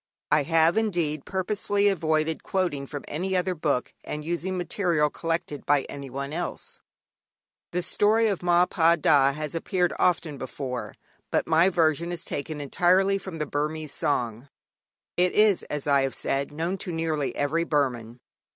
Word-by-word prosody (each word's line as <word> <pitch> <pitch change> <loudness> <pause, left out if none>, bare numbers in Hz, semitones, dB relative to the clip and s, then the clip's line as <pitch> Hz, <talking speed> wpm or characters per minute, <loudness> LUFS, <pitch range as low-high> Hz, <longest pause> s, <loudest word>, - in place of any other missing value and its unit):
I 150 0 +5
have, 165 +6 +3
indeed, 170 -9 -1
purposely 200 +1 0
avoided 160 -4 +1
quoting 170 -8 -1
from 145 0 -7
any 185 +5 -1
other 180 +1 0
book 150 -6 -1
and 150 0 -5
using 175 +3 -2
material 175 -4 +1
collected 165 -3 -3
by 145 -1 +2
anyone 140 +1 -6
else. 175 +1 -5 0.9
The 180 0 -1
story 220 +5 +3
of 200 -4 -1
Ma 175 0 +4
Pa 170 -2 +3
Da 145 -4 +4
has 150 0 -4
appeared 180 +1 0
often 165 -5 +1
before, 125 -4 -5 0.3
but - - +1
my 165 +3 +4
version 170 -1 +1
is 175 - -5
taken 150 +1 -4
entirely 185 +7 +2
from 190 -3 -7
the 155 - -2
Burmese 150 +1 -3
song. 120 -2 -2 0.7
It 180 0 +3
is, 210 -3 +4
as 150 -2 -3
I 140 -1 +4
have 135 -1 -1
said, 140 +1 -2
known 170 +5 -2
to 180 - -4
nearly 160 -4 -1
every 155 +4 0
Burman. 125 -7 -1
160 Hz, 155 wpm, -26 LUFS, 145-180 Hz, 0.9 s, I